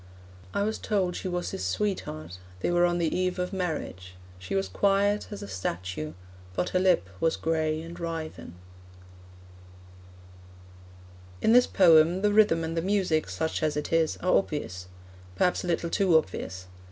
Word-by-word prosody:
I 200 - 0
was 220 +1 -2
told 190 -4 0
she - - -4
was 175 -1 -2
his 95 - -4
sweetheart. 90 - -3 0.2
They - - 0
were 175 0 +4
on 175 0 0
the 165 -2 0
eve 185 0 0
of 180 +1 -3
marriage. 150 - -4 0.2
She 95 +1 -5
was 95 0 0
quiet 200 - +1
as 205 - -7
a - - -7
statue, 90 -4 -4 0.4
But 180 - 0
her 185 - +1
lip 185 - +3
was 165 - +2
gray 155 -1 0
and 165 +1 -8
writhen. 160 - -5 2.8
In 220 - +3
this 245 0 +6
poem, 170 +1 +5
the 205 0 +3
rhythm 205 -6 +4
and 160 0 -3
the 165 - 0
music, 185 - +1
such 95 +13 -2
as 155 -1 0
it 150 - -3
is, 165 -1 +2
are 185 - +2
obvious 90 - -2 0.5
perhaps 180 - +1
a - - -4
little 170 -1 -1
too 185 -5 +4
obvious. 95 -8 -4
165 Hz, 165 wpm, -27 LUFS, -, 2.8 s, this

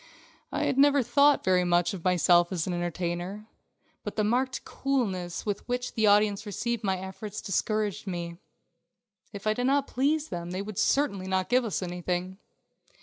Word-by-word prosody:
I - - -1
had 265 - +1
never 285 -1 +5
thought 285 +4 +4
very 185 -1 +3
much 175 +2 +2
of 180 -4 -7
myself 175 -1 +4
as 175 -3 -1
an 185 - -2
entertainer, 175 +3 -3 0.6
but - - -5
the 215 - +1
marked 255 +5 0
coolness 195 -11 -2
with 205 -2 -1
which 245 0 -2
the 220 -1 +2
audience 205 0 +4
received 235 +3 -2
my 190 -2 +1
efforts 190 +3 -7
discouraged 210 0 -1
me. 170 -2 -4 0.9
If 200 0 -9
I 215 - +3
did 245 +3 -2
not 275 +1 +2
please 290 +5 0
them 170 -1 -5
they 185 +2 -3
would 210 -2 -5
certainly 200 -10 +1
not 190 -1 0
give 250 +1 +3
us 200 -3 -2
anything. 180 +1 -3
200 Hz, 170 wpm, -28 LUFS, 180-240 Hz, 0.9 s, never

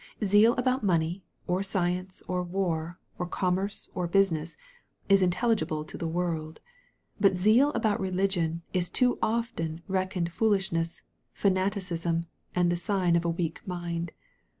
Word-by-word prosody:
Zeal 205 +4 +6
about 255 0 +1
money, 175 -1 +1 0.2
or 180 +2 0
science, 185 -1 -2
or 180 0 0
war, 175 -2 -2 0.2
or 180 - -2
com 180 0 0
merce, 200 +2 -3
or 180 -1 -1
business, 170 -4 +1 0.5
is 195 0 +6
intelligible 185 -4 +1
to - - -10
the 165 - -3
world. 160 -2 -2 0.6
But 195 -2 +4
zeal 220 +9 +5
about 220 -3 +1
religion 180 -3 0
is 180 -1 0
too 250 +4 +2
often 215 -8 -1
reckoned 185 -2 -1
foolishness, 190 -6 0 0.4
fanati 195 +1 +2
cism, 170 -1 -1 0.3
and 175 -1 +3
the 175 - 0
sign 180 0 +1
of 170 0 +1
a - - +2
weak 165 -1 -2
mind. 170 -2 -3
180 Hz, 145 wpm, -28 LUFS, 170-195 Hz, 0.6 s, Zeal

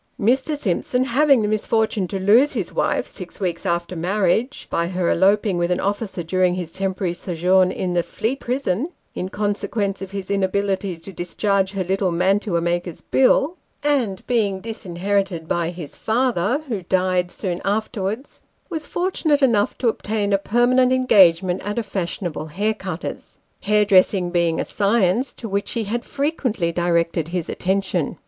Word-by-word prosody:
Mr. 265 +8 +1
Simp 195 -11 -1
son, 250 0 0
having 270 -1 +3
the - - +1
misfortune 215 -2 0
to 195 - -3
lose 220 +10 +4
his - - -3
wife - - 0
six - - -9
weeks 175 -4 -2
after 170 +1 -1
marriage 200 - 0
(by 170 - 0
her 180 -1 0
eloping 195 0 +3
with 175 0 +1
an 180 - +1
officer 200 -2 -2
during 180 +1 +1
his 175 -3 -5
temporary 190 -1 -2
sojourn 180 +1 +2
in 180 -1 -2
the 175 - +2
Fleet 225 +9 -3
Prison, 250 - -1 0.2
in 185 - -4
consequence 205 0 -2
of 195 - -5
his 195 0 -5
inability 195 -1 0
to 180 +4 -11
discharge 195 +3 0
her 195 -1 -1
little 190 0 0
mantua 185 +1 +1
maker's 175 0 -2
bill), 270 +5 +2 0.3
and 255 -10 0
being 210 -6 +1
disinherited 195 -4 -2
by 170 0 0
his 170 -4 -7
father, 240 - 0
who 220 -7 -3
died 185 0 +1
soon 180 -1 -4
afterwards, 215 +3 -3 0.3
was 315 -2 -3
fortunate 325 -5 0
enough 220 -6 +2
to 250 - 0
obtain 210 -2 0
a 195 - +3
permanent 245 +5 +3
engage 195 -10 +5
ment 180 0 -2
at 205 +2 -4
a 235 - 0
fashionable 175 -5 -3
haircutter's; 195 0 -4 0.2
hairdressing 200 -3 +3
being 170 -2 +1
a - - -1
science 210 +4 +1
to 230 - -8
which 200 0 -2
he 230 - -1
had 235 +4 -3
frequently 265 - -1
directed 170 -2 0
his 175 -1 -3
attention. 185 -4 -1
195 Hz, 160 wpm, -21 LUFS, 180-225 Hz, 0.3 s, engage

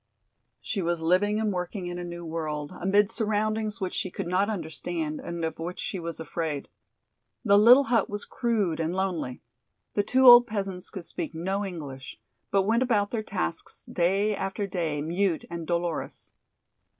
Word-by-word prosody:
She 200 - -2
was 170 -1 -1
living 205 +5 +3
and 215 -2 0
working 180 +1 -4
in 175 0 -4
a - - -4
new 175 0 -7
world, 155 -2 -4
amid 200 +3 +3
surroundings 215 -1 -1
which 190 -1 -3
she 185 - -1
could - - -5
not 185 +4 +1
understand 160 -4 -3
and 170 -1 -3
of 160 - -4
which 175 +2 -4
she 190 - -3
was 170 -1 -5
afraid. 160 -2 -3 0.8
The 200 -2 +6
little 245 +6 +8
hut 230 -5 +1
was 205 0 -5
crude 210 -9 0
and 165 +2 -1
lonely. 180 -9 -2 0.5
The 205 - +2
two 255 +6 +2
old 240 -1 +10
peasants 195 -4 -3
could 185 -3 -7
speak - - -5
no 190 +5 -1
English, 145 -9 -7 0.3
but 195 -1 +3
went 225 +4 +2
about 210 -5 +2
their 230 - -1
tasks 80 - -4
day 195 +5 +1
after 195 +2 -2
day 165 -6 -2
mute 175 +2 0
and 170 -2 -5
dolorous. 170 -1 -3
185 Hz, 170 wpm, -27 LUFS, 165-205 Hz, 0.8 s, old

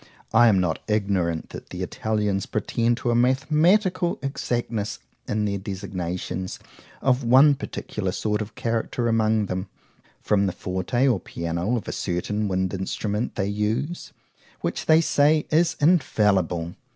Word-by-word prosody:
I 120 - +7
am 100 -4 +4
not 90 -3 0
ignorant 100 -6 0
that - - -9
the - - -5
Italians 105 -3 -1
pretend 115 +3 0
to 120 - -1
a - - +2
mathematical 155 - +2
exactness 120 -5 -2 0.3
in 105 0 0
their 100 -1 -1
designations 95 -2 -4 0.5
of 130 0 +2
one 130 +5 +6
particular 105 -8 -4
sort 105 +3 -1
of 105 +1 -7
character 115 +1 -1
among 110 -2 +2
them, 95 0 -4 0.5
from 100 -1 +1
the 95 - -2
forte 95 +8 -1
or 120 -7 +2
piano 85 +8 -2
of 115 - -6
a - - -2
certain 105 +4 -2
wind 95 -1 -1
instrument 100 +3 -2
they 95 - 0
use,—which 105 - -4
they 160 +1 +6
say 150 0 +3
is 165 +2 +3
infallible. 100 - +2
105 Hz, 140 wpm, -24 LUFS, 95-125 Hz, 0.5 s, I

